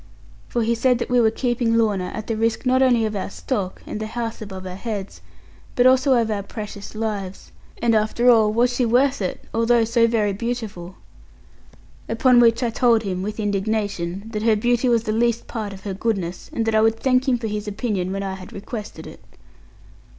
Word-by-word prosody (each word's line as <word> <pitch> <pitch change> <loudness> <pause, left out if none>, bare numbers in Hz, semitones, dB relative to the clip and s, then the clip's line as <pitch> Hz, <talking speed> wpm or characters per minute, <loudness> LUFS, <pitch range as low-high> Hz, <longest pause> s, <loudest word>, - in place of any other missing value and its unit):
For 235 - -1
he 230 +1 +1
said 250 +2 +2
that 245 - -4
we 245 -1 +4
were 220 - +4
keeping 240 0 0
Lorna, 210 -5 +1
at 215 - -5
the 225 - -2
risk 225 +3 -1
not 255 +1 +3
only 245 -4 +4
of 215 -1 -3
our 195 - -3
stock, 200 -8 -4
and - - -5
the 215 - -4
house 230 0 -4
above 190 -3 -7
our 185 - -5
heads, 205 -1 -5 0.5
but 245 -2 +3
also 260 +1 +5
of 230 -2 +1
our 205 -1 -1
precious 205 0 -8
lives; 205 -4 -4 0.3
and 235 -1 +3
after 220 +3 +1
all 220 -3 +6
was 240 +3 +2
she 250 - +1
worth 255 +2 +2
it, 185 - -3
although 230 +1 +3
so 230 +1 +3
very 215 -3 +1
beautiful? 210 -5 -5 1.1
Upon 245 +2 +4
which 230 +1 +4
I 235 - 0
told 230 -1 +3
him, 185 -3 -3
with 210 +3 -4
indignation, 200 -3 -2
that 210 - -2
her 220 0 +3
beauty 240 +3 +1
was 230 -2 +2
the 215 - -2
least 235 +1 +1
part 215 -4 -5
of 195 -1 -10
her 200 - -4
goodness, 190 -4 -3
and 225 - -2
that 225 - 0
I 215 - +4
would 225 0 +2
thank 260 +1 +2
him 250 - +3
for 235 - -6
his 210 -1 -3
opinion 200 -3 -2
when 195 +1 -3
I 195 -1 -3
had 185 -1 -10
requested 210 +1 -7
it. - - -11
225 Hz, 210 wpm, -22 LUFS, 205-240 Hz, 1.1 s, all